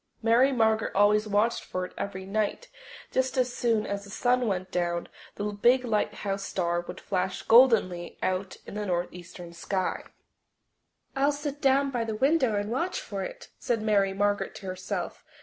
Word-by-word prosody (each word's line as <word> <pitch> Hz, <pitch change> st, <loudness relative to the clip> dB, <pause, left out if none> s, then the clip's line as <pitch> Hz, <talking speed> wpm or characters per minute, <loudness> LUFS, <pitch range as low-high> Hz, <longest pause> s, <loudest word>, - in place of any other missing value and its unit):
Mary 235 Hz, +4 st, +5 dB
Margaret 220 Hz, -3 st, +1 dB
always 210 Hz, +2 st, +4 dB
watched 210 Hz, +3 st, +1 dB
for 185 Hz, 0 st, -3 dB
it -, -, -11 dB
every 190 Hz, -1 st, -5 dB
night; 215 Hz, -, -2 dB, 0.4 s
just 260 Hz, 0 st, 0 dB
as 250 Hz, -1 st, +1 dB
soon 225 Hz, -3 st, +1 dB
as 200 Hz, 0 st, -3 dB
the 200 Hz, -, -12 dB
sun 245 Hz, +3 st, +1 dB
went 185 Hz, -2 st, -2 dB
down 175 Hz, -1 st, -1 dB, 0.3 s
the -, -, -4 dB
big 245 Hz, +5 st, +3 dB
lighthouse 205 Hz, -3 st, -1 dB
star 175 Hz, -3 st, -1 dB
would 175 Hz, -, -9 dB
flash 185 Hz, -1 st, -2 dB
goldenly 225 Hz, -8 st, +4 dB
out 185 Hz, +1 st, -1 dB
in -, -, -9 dB
the 210 Hz, 0 st, -3 dB
northeastern 175 Hz, -1 st, -4 dB
sky. 185 Hz, +2 st, -2 dB, 1.1 s
"I'll 275 Hz, +2 st, +3 dB
sit 290 Hz, 0 st, -5 dB
down 275 Hz, 0 st, +3 dB
by 240 Hz, -3 st, -1 dB
the 220 Hz, -1 st, -3 dB
window 265 Hz, -2 st, +2 dB
and 205 Hz, +1 st, -2 dB
watch 345 Hz, -, -1 dB
for -, -, -5 dB
it," -, -, -7 dB
said 230 Hz, -3 st, -1 dB
Mary 200 Hz, -3 st, +3 dB
Margaret 205 Hz, +1 st, 0 dB
to 200 Hz, -, -10 dB
herself. 185 Hz, 0 st, -4 dB
210 Hz, 165 wpm, -28 LUFS, 190-250 Hz, 1.1 s, Mary